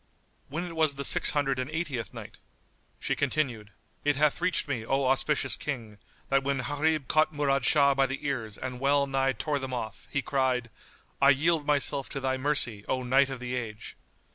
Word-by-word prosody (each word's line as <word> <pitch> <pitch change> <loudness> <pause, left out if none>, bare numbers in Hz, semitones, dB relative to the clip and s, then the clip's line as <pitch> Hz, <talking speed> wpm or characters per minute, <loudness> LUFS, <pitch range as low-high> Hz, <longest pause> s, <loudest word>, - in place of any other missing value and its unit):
When 170 +5 -3
it 170 -2 -8
was 155 -3 +2
the 140 0 -4
Six - - +5
Hundred 135 -3 0
and 130 +3 -3
Eightieth 155 -8 -3
Night, - - -10 0.6
She - - -1
continued, 130 -7 -1 0.3
It 145 0 +2
hath 150 +3 +2
reached 180 -2 +1
me, 125 -6 -2
O 135 +4 0
auspicious 135 +1 +1
King, 115 -8 -6 0.3
that 135 0 +3
when 140 -1 -1
Gharib 145 0 0
caught 155 +3 +3
Murad 140 -4 0
Shah 140 +1 +4
by 135 0 +2
the 135 +2 -6
ears 115 -7 -3
and 125 -1 -6
well 140 +1 +3
nigh 135 -1 0
tore 145 +5 -2
them 135 -1 -4
off 110 -3 -6
he 140 - -1
cried, 130 -4 0 0.5
"I 140 - +7
yield 150 +2 +2
myself 140 -2 +1
to 140 - -4
thy 130 0 0
mercy, 130 -6 +2
O 130 -1 -1
Knight 135 +2 +3
of 135 -2 -5
the 125 0 -5
Age!" 115 -3 -5
135 Hz, 190 wpm, -28 LUFS, 130-145 Hz, 0.6 s, I